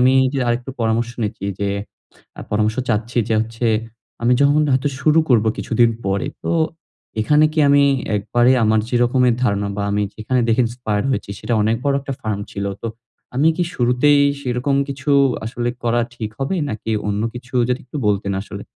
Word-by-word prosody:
আমি 130 +1 +5 0.2
যে 135 - 0
আরেকটু 120 +2 -1
পরামর্শ 115 +1 0
নিচ্ছি। 105 -2 -3
যে 100 - 0 0.7
আ - - -5
পরামর্শ 110 +1 +1
চাচ্ছি 115 +2 -1
যে 110 - +2
হচ্ছে 115 +2 -3 0.6
আমি 120 +1 +3
যখন 145 +2 +4
হয়তো 130 +2 +2
শুরু 155 +2 +4
করব 115 -5 +4
কিছুদিন 115 0 +2 0.2
পরে। 95 0 0 0.2
তো - - 0 0.7
এখানে 150 +7 +4
কি 160 - -4
আমি 140 0 +5 0.3
একবারে 120 +5 +2
আমার 110 0 +3
যেরকমের 120 0 +3
ধারণা 100 -4 +1
বা 100 - -2
আমি 105 +1 +1
যেখানে 125 +4 -1
দেখে 115 +2 +3
ইন্সপায়ার 115 -3 -2
হয়েছি 130 - -2
সেটা 120 - -2
অনেক 110 +2 +2
বড় 140 - +2
একটা 135 0 -5
ফার্ম 105 -2 -3
ছিল। 100 - -4 0.2
তো - - -3 0.5
আমি 150 +5 +3
কি 175 - +1
শুরুতেই 125 +4 +3 0.2
সেরকম 130 +2 -1
কিছু 140 +1 -4 0.3
আসলে 120 +1 -3
করা 120 0 +1
ঠিক 110 -3 -5
হবে? 135 +7 -1
নাকি 110 +1 -4 0.2
অন্য 105 +1 -1
কিছু 120 +1 -10
যদি 125 +2 0
একটু 130 - -8
বলতেন 100 -1 0
আসলে? 100 - -8
120 Hz, 175 wpm, -20 LUFS, 110-130 Hz, 0.7 s, আমি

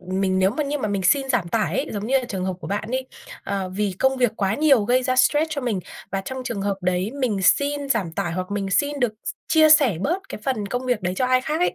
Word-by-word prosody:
mình 185 +1 -1
nếu 190 +1 +3
mà 280 +8 -2
như 290 +1 -2
mà 215 - -2
mình 200 -2 -1
xin 270 +6 +3
giảm 220 -10 0
tải 215 +3 0
ấy, - - -1
giống 205 +1 -4
như 270 +2 +3
là 255 - -4
trường 190 -5 -4
hợp 190 - -1
của - - -7
bạn 205 +3 -3
ấy, 260 0 -2 0.4
ờ, 195 -2 -2
vì 195 0 -2
công 265 0 +2
việc 245 -4 +2
quá 195 +1 0
nhiều 280 -8 +4
gây 255 +3 +2
ra 255 0 0
stress 295 +4 +4
cho 295 -2 -2
mình 225 -7 -1 0.3
và 195 - -1
trong 260 +6 -6
trường 205 -5 -3
hợp 200 -1 -1
đấy 185 +3 0
mình 210 -7 0
xin 285 +7 +2
giảm 200 -10 0
tải, 165 0 -2
hoặc 185 +2 -4
mình 200 -1 -2
xin 285 +5 +1
được 240 -4 +1
s - - -2 0.2
chia 315 -1 +5
sẻ 280 - +6
bớt 360 - -2
cái - - -7
phần 215 -7 -1
công 245 +5 -3
việc 240 -6 0
đấy 180 +1 -1
cho 255 - +1
ai 255 0 +3
khác 310 +5 -2
ấy, 360 - +1
230 Hz, 280 wpm, -23 LUFS, 195-265 Hz, 0.4 s, sẻ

